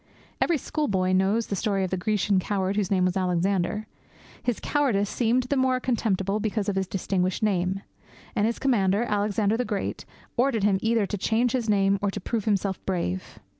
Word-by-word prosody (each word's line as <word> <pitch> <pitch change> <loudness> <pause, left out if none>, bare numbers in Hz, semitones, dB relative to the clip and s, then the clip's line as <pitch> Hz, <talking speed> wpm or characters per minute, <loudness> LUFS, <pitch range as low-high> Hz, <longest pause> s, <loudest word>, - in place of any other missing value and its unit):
Every 340 - +3
schoolboy 205 -12 -1
knows 195 +5 +2
the 200 - -3
story 195 -1 0
of 185 - -2
the - - +1
Grecian 200 +1 +1
coward 190 0 -1
whose 205 -3 0
name 185 -2 +2
was 185 0 0
Alexander. 185 +2 0 0.6
His 245 -3 -1
cowardice 235 -9 +1
seemed 245 +1 +2
the 255 +3 -1
more 260 -1 +2
contemptible 210 -5 0
because 215 -1 -1
of 200 - 0
his 190 -1 0
distinguished 185 0 -1
name; 190 -1 0 0.5
and 210 -1 +2
his 230 - -1
commander, 210 -5 +2
Alexander 210 0 +1
the 250 - 0
Great, 210 -4 -3 0.3
ordered 240 -4 +2
him 200 -2 +3
either 225 -2 +2
to 205 0 -4
change 225 +5 +1
his 235 -3 -1
name 195 -1 +3
or 205 - +1
to - - -4
prove 220 +2 -3
himself 200 -3 0
brave. 95 - -2
205 Hz, 185 wpm, -26 LUFS, 190-225 Hz, 0.6 s, Every